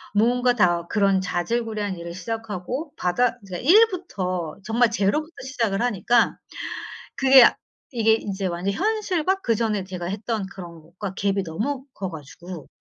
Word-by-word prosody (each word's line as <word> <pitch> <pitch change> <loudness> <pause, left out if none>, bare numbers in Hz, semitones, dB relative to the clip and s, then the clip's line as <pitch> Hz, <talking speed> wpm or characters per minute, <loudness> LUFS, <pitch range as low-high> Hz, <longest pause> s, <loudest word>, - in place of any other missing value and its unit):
무언가 245 +3 +3
다 175 -6 +2
그런 195 -2 +2
자질구레한 205 +3 -2
일을 170 0 -7
시작하고 225 - -4
바닥 235 +7 +1
이제 185 -3 -6
1 410 - +7
부터 185 - -4
정말 230 +3 +3
0 205 +6 +1
부터 315 +2 -15
시작을 230 -7 -1
하니까 240 0 +2 0.8
그게 270 -2 +8 0.4
이게 225 -3 +3
이제 200 -3 -2
완전히 180 +3 -2
현실과 385 -3 0
그전에 220 - 0
제가 185 -2 -6
했던 210 +2 -3
그런 175 -4 -10
것과 180 +5 -7
갭이 195 0 0
너무 255 - -3
커 190 -2 -4
가지고 165 +1 -9
210 Hz, 300 characters per minute, -24 LUFS, 185-245 Hz, 0.8 s, 그게